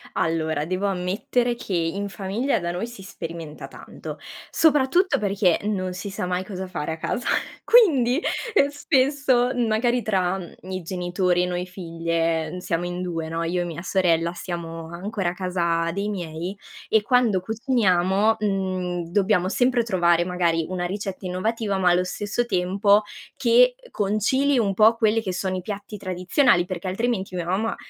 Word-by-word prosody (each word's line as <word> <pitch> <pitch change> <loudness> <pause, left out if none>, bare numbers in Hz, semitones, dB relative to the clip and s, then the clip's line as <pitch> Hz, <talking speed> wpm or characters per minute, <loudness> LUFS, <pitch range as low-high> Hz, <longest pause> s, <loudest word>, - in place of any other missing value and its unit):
Allora 160 -2 0
devo 185 +4 -2
ammettere 200 +6 0
che 210 - -6
in 175 +4 -1
famiglia 210 +8 -1
da 170 -1 -3
noi 180 +6 -3
si 235 -4 -11
sperimenta 165 -4 -7
tanto, - - -9 0.3
soprattutto 320 +4 +3
perché 195 -3 +2
non 190 -3 -2
si 185 +3 -6
sa 190 - -4
mai 180 0 -1
cosa 190 -1 -6
fare 165 -3 -3
a - - -6
casa 235 +8 -3 0.4
quindi, 300 - +5 0.3
ehm, 280 -9 +5
spesso, 275 -3 +2
mhmm, 245 -2 0
magari 240 +3 +1
tra, 190 -3 0
mhmm, 175 -3 -9 0.2
i 185 0 -3
genitori 180 +1 0
e - - +2
noi 180 0 -2
figlie, 165 -2 -2
mhmm, - - -6
siamo 170 -1 -2
in 175 0 -4
2, 165 -3 -3
no, 165 +1 -2
io 175 +2 -1
e - - -2
mia 170 -1 -6
sorella, 170 -3 +1
siamo 165 -2 -6
ancora 190 +1 -2
a - - -4
casa 170 -2 0
dei 200 +4 -2
miei 175 -1 -5 0.3
e 220 - +4
quando 230 -4 +2
cuciniamo, 210 -2 +2
mhmm, 185 -4 -1
dobbiamo 190 -1 +2
sempre 245 +2 +2
trovare 175 -5 +3
magari 170 -2 0
una 180 -1 -2
ricetta 195 0 -5
innovativa, 200 +3 -1
ma 185 -1 +3
allo 180 +1 +3
stesso 205 +5 -2
tempo 200 0 +3 0.3
che, - - +4
uhm, - - -15
concili 235 +8 +1
un 200 -4 +1
po' 215 +3 +5
quelle 225 -1 +2
che 190 -4 -3
sono 185 +1 -2
i - - -4
piatti 205 +2 -6
tradizionali, 185 +3 +2
perché 180 0 -5
altrimenti 195 -1 -1
mia 175 -2 -2
mamma 205 +6 -1
190 Hz, 170 wpm, -24 LUFS, 175-220 Hz, 0.4 s, quindi